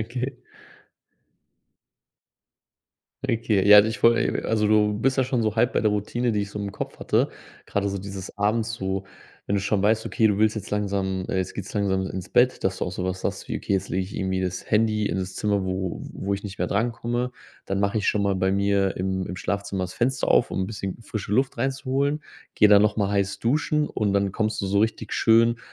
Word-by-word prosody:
Okay. 125 +3 -4 2.9
Okay, 110 -5 +1
ja, 105 0 +10
ich 110 -1 -3
wollte 115 0 +3
also, 105 -2 +1
du 105 -1 +3
bist 130 +5 +1
ja 130 - +3
schon 125 -2 0
so 110 0 -1
halb 120 +3 +3
bei - - +1
der 110 - +2
Routine, 115 +4 -1
die 105 -2 0
ich 100 - -6
so 105 - -6
im 100 - -3
Kopf - - -7
hatte. - - +1 0.4
Grade 100 0 -1
so 100 0 -3
dieses 95 0 -8
Abends 110 +3 +1
so 95 -2 -3 0.4
wenn 100 - 0
du 100 - 0
schon 100 0 +1
weißt, 110 +2 +2
okay, 115 -3 +2
du 105 -2 +2
willst 110 +1 +2
jetzt 105 0 -5
langsam 100 -2 -1
äh, 95 - -1
jetzt 95 - -3
geht's 100 -1 -6
langsam 95 -2 0
ins 95 0 -6
Bett, 125 +1 +3
dass 95 - +1
du - - -1
auch 90 - -4
sowas 95 0 -4
hast, - - -3
wie: - - -2
„Okay, - - -3
jetzt 95 - 0
lege 95 +1 -1
ich 95 - -11
irgendwie 95 -1 -1
das 90 -1 -4
Handy 105 -1 +2
in 85 - -1
das 95 0 -4
Zimmer, 100 -2 0
wo 95 -1 -3
wo 100 - -3
ich 100 - -7
nicht 100 -2 -7
mehr - - 0
drankomme. 120 +3 -1 0.3
Dann 95 0 -1
mache 100 +2 0
ich 100 - -2
schon 105 - +2
mal 100 -1 +1
bei 95 +1 +1
mir 100 -1 +1
im 95 0 -1
im 90 - -6
Schlafzimmer 100 -1 -2
das 90 - -8
Fenster 130 +2 0
auf, - - +4
um - - -1
'n 95 - -1
bisschen 100 -2 -5
frische 105 -2 -5
Luft 130 +4 +1
reinzuholen, 135 +3 -1 0.3
gehe 105 - +5
dann 100 -1 +7
nochmal 105 -1 +1
heiß 100 0 0
duschen“ 150 +4 +1
und 105 -2 -1
dann 100 -1 +1
kommst 110 +1 -1
du 100 - -2
so 100 +1 +1
richtig 110 +1 -1
schön 115 +1 +4
105 Hz, 220 wpm, -24 LUFS, 95-115 Hz, 2.9 s, ja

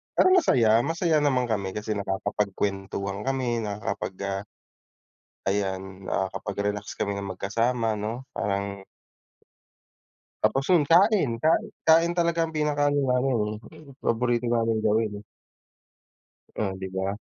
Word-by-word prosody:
parang 370 0 +6
masaya, 115 - +4
masaya 165 +3 +1
naman 135 -4 +2
kami 100 -5 -2
kasi 105 +1 -4
nakakapagkwentuhan 100 -1 -2
kami, 130 -3 0
nakakapag, 100 -2 -4
ah 100 0 -2 1.0
ayan, 95 -1 -2
nakakapag-relax 100 +2 -2
kami 100 -1 -2
ng 100 -2 -5
magkasama 115 +2 0
'no, 115 +5 -4
parang 100 -1 -3 1.6
Tapos 110 +6 +2
'yun 165 -5 +5
kain, 185 - +5
kain 160 +1 +3 0.2
kain 165 +1 +6
talaga 170 -1 +1
ang 160 - -10
pinaka-ano 145 -1 +1
namin 125 0 +2 0.4
eh, 155 - -14 0.2
paborito 120 +1 0
naming 115 -1 +1
gawin. 110 -1 +1 1.4
Oh, 100 -3 -1
'di 95 0 -5
ba. 95 +2 -2
110 Hz, 115 wpm, -26 LUFS, 100-135 Hz, 1.6 s, parang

